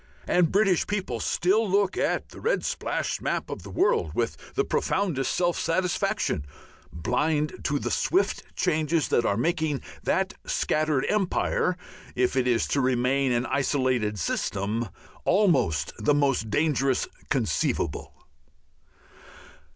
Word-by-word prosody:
And 175 -3 +3
British 195 -3 +3
people 205 -2 -2
still 205 +4 +1
look 195 0 +2
at - - -1
the - - -12
red 485 - 0
splashed - - -2
map - - -2
of - - -5
the - - -10
world 435 +3 +1
with - - 0 0.2
the 410 - +2
profoundest 175 -9 0
self 175 -1 +1
satisfaction, 175 - 0 0.5
blind 145 - -1
to 145 - +1
the - - -3
swift 375 +3 +1
changes 155 0 +1
that 120 - +2
are 100 - +1
making 155 +1 0 0.2
that - - 0
scattered 155 -3 0
empire 185 -2 +1 0.4
if 125 +1 +1
it 130 -1 +2
is 120 -2 +2
to 140 - +1
remain 130 +1 +2
an 120 +1 +1
isolated 130 -7 0
system 100 +5 -2 0.3
almost 165 - +2
the 145 - +3
most 135 -6 +1
dangerous 135 0 +1 0.2
conceivable. - - -1
150 Hz, 130 wpm, -26 LUFS, 125-185 Hz, 0.5 s, And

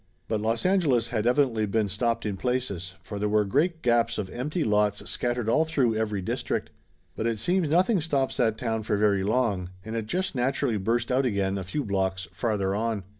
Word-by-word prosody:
But 110 -2 -1
Los 115 +5 -1
Angeles 145 -12 +2
had 115 -1 0
evidently 125 -4 +2
been 105 +1 +1
stopped 115 +4 -1
in 105 -2 -1
places, 100 -6 -2
for 105 - -6
there 105 +1 0
was 105 0 +3
great 160 - +1
gaps 120 -1 +2
of 95 -2 -4
empty 150 +7 -2
lots 105 -1 +1
scattered 120 -2 -1
all 155 +8 +4
through 140 -8 +1
every 105 -3 -1
district. - - -2 0.4
But 110 - -1
it 115 -1 0
seems 175 - +1
nothing 185 +4 +3
stops 140 -4 0
that 110 -1 +2
town 110 -2 -1
for 105 -1 0
very 100 -2 +2
long, 100 -4 0 0.2
and 110 +1 -5
it 110 -2 -3
just 190 - -1
naturally 130 -2 0
burst 115 +5 0
out 130 +1 +2
again 100 -3 0
a 95 - -3
few 125 +10 -3
blocks 95 -2 -1
farther 100 -5 -1
on. 110 -1 -1
115 Hz, 200 wpm, -27 LUFS, 105-130 Hz, 0.4 s, all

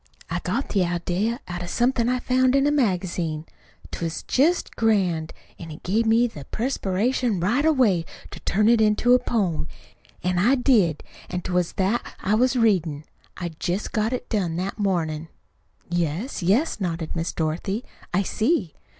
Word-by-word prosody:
I - - 0
got 275 - -2
the 195 -3 +2
idea 180 - -1
out 175 0 -5
of 175 - -5
something 240 +1 +1
I 250 - +2
found 255 +1 +2
in 275 0 +3
a 290 - +3
magazine. 180 - 0 0.5
'T - - -5
was 165 -1 -3
jest 320 +7 +1
grand; 185 -8 +1 0.3
an' 165 - -8
it 150 - -10
give 220 +5 +1
me 230 +2 +4
the 150 - -6
perspiration 230 -1 0
right 230 +11 +1
away 250 - +3 0.3
to - - -8
turn 210 +3 +1
it 230 -1 +5
into 215 +3 +4
a 250 - +6
poem. 185 -11 -1 0.6
An' 180 0 +1
I 240 +9 +4
did. 220 - +2 0.3
An' 180 0 -3
't 185 - -5
was 180 -1 +1
that 200 +5 -1
I 205 - 0
was 255 +4 +3
readin'. 175 - +2 0.3
I'd 170 -3 -6
jest 180 +4 -2
got 220 +1 0
it 250 -1 -3
done 185 -7 -1
that 190 +5 -3
mornin'." 165 -6 -1 0.6
"Yes, 175 - -2
yes," 215 - +1
nodded 165 -3 -3
Miss 165 0 -2
Dorothy. 175 +8 -2 0.3
"I 195 +3 +2
see." 215 - 0
195 Hz, 170 wpm, -24 LUFS, 175-240 Hz, 0.6 s, a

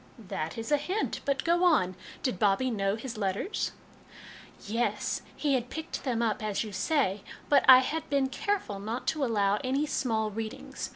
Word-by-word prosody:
" - - -26 0.2
That 155 +5 -3
is 225 +4 -5
a 295 - +5
hint. 365 +9 -2
But 275 -2 0
go 345 +2 +2
on; 290 - +4 0.3
did 245 -9 -1
Bobbie 210 +5 +2
know 195 -2 0
his 230 -1 -6
letters? 200 - -1 0.3
" - - -17
" - - -21
Yes, 230 +4 -1
he 290 -2 0
had 245 -2 0
picked 320 0 -5
them 240 -4 0
up, 220 -2 0
as 210 0 -1
you 215 - -7
say; 200 -1 +1 0.3
but 280 -2 +5
I 255 0 +11
had 320 +4 -3
been 275 -2 +2
careful 265 - -2
not 225 +5 -4
to 305 -3 -1
allow 205 -4 +2
any 270 +4 +1
small 220 -7 0
readings. 220 +1 -5
240 Hz, 190 wpm, -29 LUFS, 210-285 Hz, 0.3 s, I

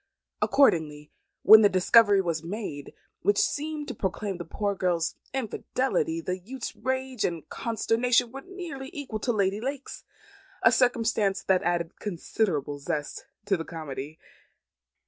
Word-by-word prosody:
Accordingly, 155 - +2 0.3
when 220 +2 +10
the 205 - +6
discovery 200 +2 +5
was 165 -4 -2
made, 170 -5 -6 0.3
which 205 +1 +2
seemed 300 0 -1
to - - -4
proclaim 195 0 -3
the 175 - -5
poor 205 +4 -2
girl's 175 -3 0 0.2
infidelity, 255 -7 -1
the 180 +2 -3
youth's 245 +7 -7
rage 260 -2 -2
and 170 -3 -2
consternation 235 +1 +1
were 270 +2 -7
nearly 340 -8 -7
equal 260 -7 -5
to 240 - 0
Lady 200 -1 0
Lake's; 275 +2 -5 0.6
a - - +7
circumstance 225 -5 +2
that 190 -1 +3
added 175 -1 -2
considerable 165 -6 -2
zest 150 0 -4 0.2
to 200 -1 +2
the 165 - -4
comedy. 155 -2 -7
205 Hz, 135 wpm, -27 LUFS, 170-250 Hz, 0.6 s, when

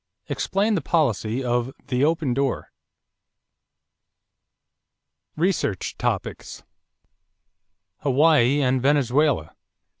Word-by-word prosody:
Explain 205 +3 0
the 185 - 0
policy 130 - 0
of 120 +1 -1 0.2
the 125 +1 +1
"open 155 -4 +1
door." 135 0 -2 2.6
=Research 160 - -1
Topics= - - -4 1.4
=Hawaii 145 -1 +3
and 130 0 +1
Venezuela. 140 - +1
140 Hz, 70 wpm, -23 LUFS, 125-155 Hz, 2.6 s, =Hawaii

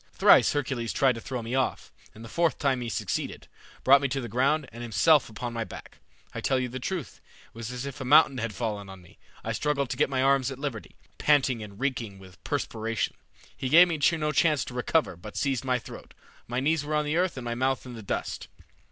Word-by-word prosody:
Thrice - - +6
Hercules 130 -5 -2
tried 135 -2 +3
to 115 - -8
throw 125 -2 -5
me 115 +2 -5
off, 130 0 -1 0.2
and 110 +1 -10
the - - -8
fourth 170 +5 +1
time 135 -4 0
he 120 - -4
succeeded, - - -3 0.4
brought 135 +1 +7
me 140 - +1
to 135 +1 -2
the 120 - -5
ground, 135 +5 +1
and 120 +1 -9
himself 135 +6 +3
upon 120 +2 -5
my 115 -1 -2
back. - - -11 0.3
I - - -5
tell 130 -1 +1
you 125 -1 -2
the 130 +2 -6
truth, 165 - -5 0.2
it - - -29
was 115 0 -6
as 125 +1 -5
if 140 0 -7
a - - -2
mountain 135 0 +5
had 115 -2 -3
fallen 105 -4 -3
on 95 -1 -11
me. 85 - -20 0.2
I - - -3
struggled 140 -3 -1
to - - -3
get - - +2
my 130 -1 0
arms 135 -1 +3
at 135 - -7
liberty, 135 -6 -5 0.2
panting 135 -5 +3
and 100 -1 -10
reeking 120 -7 -2
with 95 -1 -16
perspiration. 115 0 -2 0.4
He 130 - -3
gave 170 +5 +8
me 165 -3 -2 0.2
no 150 -1 0
chance 150 -1 +2
to - - -8
recover, 125 - +1
but 100 +5 -10
seized 135 -3 0
my 130 -1 +2
throat. 120 - -11 0.3
My 125 +1 -2
knees 150 +3 +1
were 150 +1 -2
on 150 0 +1
the 150 +2 0
earth 180 -4 0
and 125 - -6
my 120 - -2
mouth 130 +2 0
in 125 - -8
the 115 - -8
dust. 100 - -4
130 Hz, 235 wpm, -27 LUFS, 115-145 Hz, 0.4 s, gave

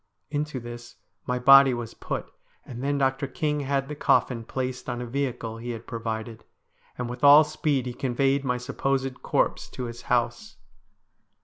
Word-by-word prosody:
Into 150 -2 -2
this 120 0 -9 0.3
my 125 - 0
body 135 0 +7
was 120 -2 -6
put, - - -5 0.3
and 125 0 -7
then 145 +1 0
Dr. 135 0 0
King 150 0 -1
had 135 -1 -1
the 150 - -5
coffin 125 -4 +2
placed 125 +1 -4
on 120 0 -3
a 125 - -4
vehicle 120 -3 -3
he 120 +2 -7
had 115 -1 -6
provided, 115 -1 -5 0.5
and 125 - -3
with 125 +3 -7
all 145 +2 +9
speed 150 -3 -1
he 125 - -4
conveyed 135 +2 0
my 125 -2 0
supposed 135 +1 -2
corpse - - 0
to 125 - -6
his 120 -1 -6
house. 120 - 0
130 Hz, 170 wpm, -26 LUFS, 120-140 Hz, 0.5 s, all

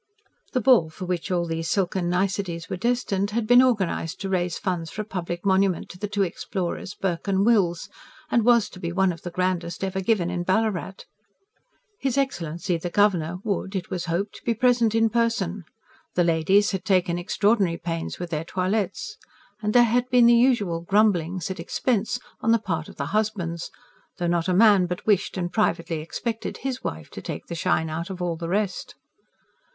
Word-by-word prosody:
The 255 - +1
ball 225 -9 +5
for 170 +3 -7
which 180 -2 -3
all 175 -2 +1
these 165 0 -3
silken 185 -2 0
niceties 180 -2 -1
were - - 0
destined 205 -2 0
had 220 +1 -1
been 245 +3 +7
organised 200 -10 0
to 195 - -3
raise 180 -2 0
funds 175 -4 -2
for 215 - -4
a - - -15
public 175 -3 -5
monument 190 -1 +2
to 180 - -11
the 205 - -2
two 205 0 0
explorers, 185 +1 -4
Burke 185 -1 -3
and 195 0 +2
Wills, 190 -8 +2 0.4
and 235 - +3
was 235 -2 +4
to 185 - -11
be 170 -1 -3
one 190 +1 +2
of 165 - -12
the 175 - -5
grandest 175 -1 -2
ever 190 0 -2
given 185 -3 +1
in 175 -1 -2
Ballarat. 190 0 -1 0.9
His 270 -1 -1
Excellency 175 - -1
the 175 - -4
Governor 180 -4 +2
would, 200 -2 -2
it 185 -1 -4
was 180 -2 -2
hoped, 180 +5 -3
be 235 - 0
present 235 -1 +3
in 225 -1 +3
person; 210 -6 0 0.5
the 175 - +4
ladies 170 +5 +3
had 190 -2 -3
taken 180 -3 +1
extraordinary 195 -1 +1
pains 165 -1 -4
with 175 -1 -6
their 155 -1 -1
toilettes, 190 +3 -2 0.4
and 210 -1 0
there 240 +2 +6
had 245 +2 +1
been 250 -1 +5
the 235 - +7
usual 235 -9 +3
grumblings 185 -2 +1
at 190 - -6
expense 225 -5 0 0.2
on 225 - +1
the 230 - +6
part 165 -7 -3
of - - -12
the 140 - -3
husbands 190 -6 -1 0.5
though 175 - -2
not 170 0 +1
a 185 - +2
man 200 -3 +6
but 180 0 -5
wished 200 -2 +1
and 175 -1 -3
privately 170 -6 0
expected 225 +8 -4
HIS 260 -1 -4
wife 80 0 -5
"to - - -8
take 80 - -6
the - - -7
shine 165 -1 0
out 170 +3 -4
of 190 -1 -6
all 175 -2 -1
the 165 0 -5
rest." 200 0 -2
190 Hz, 190 wpm, -24 LUFS, 170-215 Hz, 0.9 s, been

